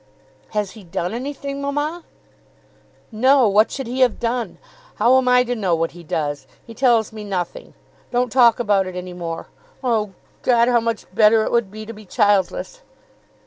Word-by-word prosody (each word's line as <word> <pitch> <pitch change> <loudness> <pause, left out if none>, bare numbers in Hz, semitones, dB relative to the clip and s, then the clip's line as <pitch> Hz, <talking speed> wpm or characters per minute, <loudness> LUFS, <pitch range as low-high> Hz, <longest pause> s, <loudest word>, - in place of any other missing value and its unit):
"Has 210 -2 -1
he 215 - -13
done 175 +2 -4
anything, 275 +2 -5
mamma?" 295 +4 -2 1.1
"No. 255 +3 +4
What 210 +2 +4
should 270 - -5
he 250 +3 -4
have 255 -3 +3
done? 235 0 -2 0.4
How 250 +2 +4
am 255 - -2
I 250 0 +5
to 245 0 -2
know 190 -6 +1
what 165 0 -1
he 175 +1 -13
does? 145 -2 -3 0.2
He 230 - -11
tells 230 -3 +2
me 215 -1 -7
nothing. 185 -4 -5 0.3
Don't 245 -1 0
talk 240 -3 +5
about 205 -5 +2
it 185 - -7
any 180 0 -6
more. 170 -2 -5 0.4
Oh, 220 -5 0 0.3
God, 235 -1 +3
how 245 -1 +4
much 230 -2 -3
better 215 +2 +5
it - - -2
would 235 -4 +1
be 215 +2 -9
to 230 - -8
be 215 -1 -13
childless!" 205 - 0
225 Hz, 180 wpm, -21 LUFS, 195-250 Hz, 1.1 s, I